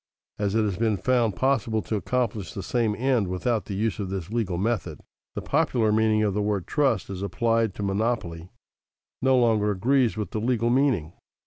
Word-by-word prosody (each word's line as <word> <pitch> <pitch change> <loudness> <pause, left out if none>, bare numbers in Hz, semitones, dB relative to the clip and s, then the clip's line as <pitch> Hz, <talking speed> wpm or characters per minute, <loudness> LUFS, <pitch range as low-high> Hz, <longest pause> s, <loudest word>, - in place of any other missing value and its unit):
As 100 0 0
it 110 - +3
has 100 -4 -1
been 110 -2 +1
found 120 -3 +1
possible 115 -4 0
to 110 - -3
accomplish 110 -4 -2
the 95 - -4
same 115 0 0
end 125 -4 +1
without 105 +5 -1
the 100 - -5
use 110 0 -1
of 100 -2 -3
this 95 -1 -5
legal 110 -7 -1
method, 105 -1 -2 0.4
the - - -4
popular 130 -8 +1
meaning 110 0 +2
of 105 -2 +1
the 105 - 0
word 105 -3 -1
trust, 135 - +1
as 95 -1 -5
applied 115 +2 0
to 105 - -5
a - - 0
monopoly, 95 -5 -2 0.7
no 130 0 +4
longer 110 -4 +3
agrees 120 +4 +1
with 105 - -4
the 110 - -3
legal 120 0 +1
meaning. 125 - +1
110 Hz, 195 wpm, -25 LUFS, 100-120 Hz, 0.7 s, no